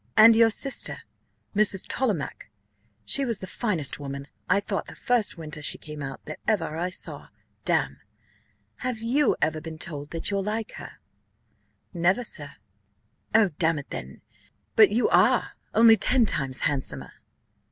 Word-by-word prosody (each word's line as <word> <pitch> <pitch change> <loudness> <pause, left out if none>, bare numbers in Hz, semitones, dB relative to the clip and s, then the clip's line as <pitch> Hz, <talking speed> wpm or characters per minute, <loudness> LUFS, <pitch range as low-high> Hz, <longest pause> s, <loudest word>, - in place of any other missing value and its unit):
and 225 +1 +9
your 225 0 +6
sister, 270 +4 -1 0.5
Mrs. 205 -2 +2
Tollemache? 210 - -2 0.6
she 280 - +4
was 235 -5 0
the - - -7
finest 185 - -1
woman, 140 -1 -6 0.2
I 195 - +4
thought, 200 -1 -4
the - - -10
first 240 -7 +1
winter 155 -2 -7
she - - +2
came 150 -1 -9
out, 135 -1 -7
that 155 - -8
ever 175 -8 0
I 175 +3 -2
saw, 185 - -7 0.4
damme. - - 0 0.8
Have 250 -2 -3
you 270 +6 +2
ever 155 0 0
been 160 0 -8
told 145 -2 -4
that 165 +4 0
you're 200 0 0
like 215 +2 -3
her?" - - -9 1.0
"Never, 180 +7 +1
sir." 145 -10 -7 0.8
"Oh, 220 -3 +5
damn 165 -2 +2
it 145 - -8
then, 65 +2 -7 0.5
but 215 -2 +7
you 225 +4 +2
are; - - +3 0.2
only 225 0 +7
ten 240 +4 +4
times 135 -9 -1
handsomer." 140 -2 -1
190 Hz, 150 wpm, -26 LUFS, 150-225 Hz, 1.0 s, and